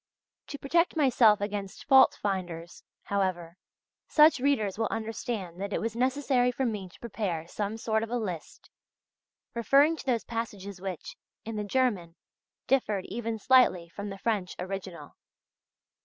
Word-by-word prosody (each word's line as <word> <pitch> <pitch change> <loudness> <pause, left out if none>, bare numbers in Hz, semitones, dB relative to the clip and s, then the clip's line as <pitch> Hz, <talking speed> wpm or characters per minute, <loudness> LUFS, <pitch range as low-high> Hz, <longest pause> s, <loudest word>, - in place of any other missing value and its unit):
To 285 - -6
protect 335 +6 +1
myself 245 -8 +4
against 205 -1 -4
fault 265 -2 +6
finders, 175 -4 -4 0.2
however, 185 -4 -2 0.5
such 305 -2 +5
readers 225 -7 0
will 225 - +1
understand 220 -5 -4
that 200 0 -3
it - - 0
was 225 0 -3
necessary 255 0 +2
for 265 +2 -2
me 210 -5 -3
to - - -19
prepare 195 -8 -3
some 210 +4 -3
sort 220 -1 0
of 225 - -4
a 245 - -1
list 185 -8 -6 0.8
referring 275 +7 +4
to - - -9
those 240 -3 +1
passages 200 -5 -5
which, 190 -3 -6 0.3
in 225 0 -5
the 210 - -2
German, 205 -7 0 0.5
differed 215 -8 +1
even 230 -1 -3
slightly 220 -7 +4
from 200 +4 -6
the 195 - -7
French 200 -4 -2
original. 180 -5 -7
215 Hz, 145 wpm, -28 LUFS, 190-245 Hz, 0.8 s, fault